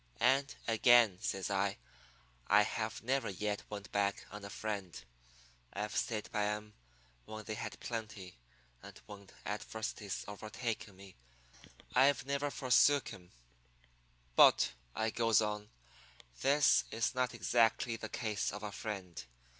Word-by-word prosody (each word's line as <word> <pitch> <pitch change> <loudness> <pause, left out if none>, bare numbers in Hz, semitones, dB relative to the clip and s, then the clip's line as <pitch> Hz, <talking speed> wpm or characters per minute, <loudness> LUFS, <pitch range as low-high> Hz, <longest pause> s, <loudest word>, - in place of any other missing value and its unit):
And, 135 +1 +3
again,' 115 -4 +5
says 95 +1 -2
I, 100 0 0 0.7
'I 105 +1 +6
have 110 +1 -3
never 135 +1 0
yet 105 +2 -2
went 100 -1 -7
back 100 0 0
on 105 0 -8
a 100 - -7
friend. 100 -4 -4 0.7
I've 105 +1 -4
stayed 110 -4 -2
by 105 -2 0
'em 105 0 -4 0.5
when 110 +6 -7
they 110 - -4
had - - -6
plenty, 110 -5 -6 0.5
and - - -12
when 100 -1 -11 0.2
adversity's 105 0 -4
overtaken 110 0 -5
me 95 0 -14 0.8
I've 135 +2 +4
never 140 +1 -1
forsook 140 +1 +3
'em. 90 -1 -14 1.0
"'But,' - - +6 0.2
I 110 0 0
goes 115 -1 +3
on, 105 -1 -2 0.7
'this 140 +1 +4
is 115 +2 -1
not 125 -2 0
exactly 115 +2 +2
the 115 - -6
case 110 -4 -2
of 105 +1 -7
a 105 - -4
friend. 95 - -6
105 Hz, 130 wpm, -34 LUFS, 100-115 Hz, 1.0 s, I